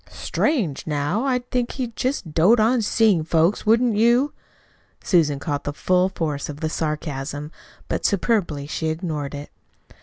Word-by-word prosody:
"Strange! 210 Hz, -, -1 dB
Now, 150 Hz, -, -1 dB
I'd 250 Hz, -2 st, 0 dB
think 245 Hz, -1 st, -1 dB
he'd 245 Hz, -4 st, -4 dB
just 250 Hz, -, -2 dB
dote 190 Hz, +10 st, +5 dB
on 230 Hz, +3 st, +3 dB
seeing 210 Hz, -5 st, +3 dB
folks, 165 Hz, +6 st, +1 dB
wouldn't 230 Hz, 0 st, +3 dB
you?" 240 Hz, +6 st, +3 dB, 0.7 s
Susan 155 Hz, -7 st, +2 dB
caught 145 Hz, 0 st, -3 dB
the 145 Hz, -, -3 dB
full 185 Hz, +4 st, +2 dB
force 150 Hz, -6 st, -3 dB
of 145 Hz, 0 st, -7 dB
the 160 Hz, -1 st, -2 dB
sarcasm, 150 Hz, -2 st, -4 dB, 0.4 s
but -, -, -2 dB
superbly 190 Hz, -8 st, 0 dB
she 160 Hz, +2 st, -3 dB
ignored 155 Hz, -4 st, -3 dB
it. 145 Hz, +1 st, -8 dB
170 Hz, 150 wpm, -22 LUFS, 150-230 Hz, 0.7 s, dote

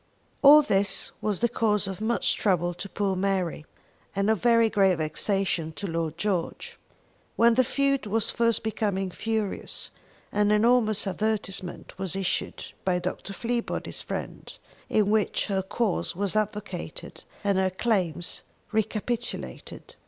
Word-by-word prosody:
All 295 Hz, +2 st, +9 dB
this 200 Hz, -6 st, +1 dB
was 210 Hz, -2 st, -1 dB
the 235 Hz, -, +4 dB
cause 210 Hz, -3 st, +1 dB
of 195 Hz, +1 st, -5 dB
much 230 Hz, +2 st, +1 dB
trouble 175 Hz, -3 st, +1 dB
to 195 Hz, +3 st, -7 dB
poor 195 Hz, -1 st, -1 dB
Mary, 185 Hz, -5 st, -1 dB, 0.5 s
and 200 Hz, +2 st, +2 dB
of 220 Hz, -, 0 dB
very 230 Hz, -1 st, +5 dB
great 195 Hz, -4 st, +3 dB
vexation 165 Hz, +1 st, 0 dB
to 200 Hz, -, -6 dB
Lord 165 Hz, -3 st, -2 dB
George. 190 Hz, -5 st, -2 dB, 0.6 s
When 235 Hz, 0 st, +5 dB
the 255 Hz, +2 st, +4 dB
feud 275 Hz, -1 st, 0 dB
was 220 Hz, +1 st, +1 dB
first 230 Hz, -2 st, +2 dB
becoming 200 Hz, -3 st, -1 dB
furious, 220 Hz, +2 st, -2 dB, 0.4 s
an 210 Hz, 0 st, +2 dB
enormous 215 Hz, 0 st, +3 dB
advertisement 195 Hz, -3 st, -3 dB
was 190 Hz, -1 st, -2 dB
issued 195 Hz, -2 st, -2 dB, 0.2 s
by 185 Hz, -1 st, +2 dB
Dr. 185 Hz, +2 st, -4 dB
Fleabody's 235 Hz, +3 st, -3 dB
friends, -, -, -6 dB, 0.3 s
in 210 Hz, -1 st, +2 dB
which 215 Hz, -1 st, +1 dB
her 195 Hz, -2 st, 0 dB
cause 200 Hz, 0 st, -1 dB
was 200 Hz, +2 st, -1 dB
advocated 210 Hz, -6 st, -3 dB, 0.2 s
and 200 Hz, -2 st, +2 dB
her 190 Hz, 0 st, +2 dB
claims 185 Hz, -4 st, -1 dB, 0.3 s
recapitulated. 220 Hz, +2 st, -3 dB
205 Hz, 135 wpm, -27 LUFS, 190-220 Hz, 0.6 s, All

